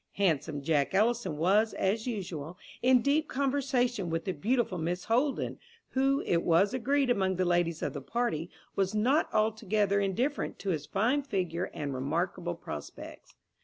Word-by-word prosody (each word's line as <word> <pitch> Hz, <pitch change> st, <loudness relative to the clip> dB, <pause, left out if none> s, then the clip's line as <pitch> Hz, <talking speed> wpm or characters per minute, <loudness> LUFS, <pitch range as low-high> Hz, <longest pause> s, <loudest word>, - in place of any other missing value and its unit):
Handsome 155 Hz, -6 st, 0 dB
Jack 150 Hz, +2 st, +1 dB
Ellison 215 Hz, -6 st, +1 dB
was, 205 Hz, +7 st, +3 dB
as 215 Hz, +5 st, 0 dB
usual, 180 Hz, -, -5 dB, 0.2 s
in 250 Hz, -1 st, +5 dB
deep 295 Hz, +2 st, +2 dB
conversation 260 Hz, -7 st, 0 dB
with 165 Hz, 0 st, -2 dB
the 190 Hz, -, 0 dB
beautiful 205 Hz, -, 0 dB
Miss 175 Hz, +3 st, -2 dB
Holden, 255 Hz, +5 st, 0 dB, 0.3 s
who, 270 Hz, +1 st, +2 dB
it 170 Hz, -, +1 dB
was 180 Hz, +7 st, +3 dB
agreed 265 Hz, +1 st, +1 dB
among 190 Hz, -4 st, +1 dB
the 185 Hz, +1 st, +1 dB
ladies 175 Hz, -2 st, +1 dB
of -, -, -2 dB
the 145 Hz, -, -5 dB
party, 175 Hz, -, -2 dB, 0.3 s
was 195 Hz, +1 st, 0 dB
not 255 Hz, +9 st, +2 dB
altogether 215 Hz, -2 st, +1 dB
indifferent 235 Hz, +9 st, -1 dB
to 195 Hz, -, -2 dB
his 150 Hz, -3 st, -3 dB
fine 235 Hz, -, +1 dB
figure 185 Hz, -, -2 dB
and 145 Hz, -3 st, -4 dB
remarkable 170 Hz, +6 st, -2 dB
prospects. 75 Hz, -, -9 dB
195 Hz, 155 wpm, -30 LUFS, 170-245 Hz, 0.3 s, in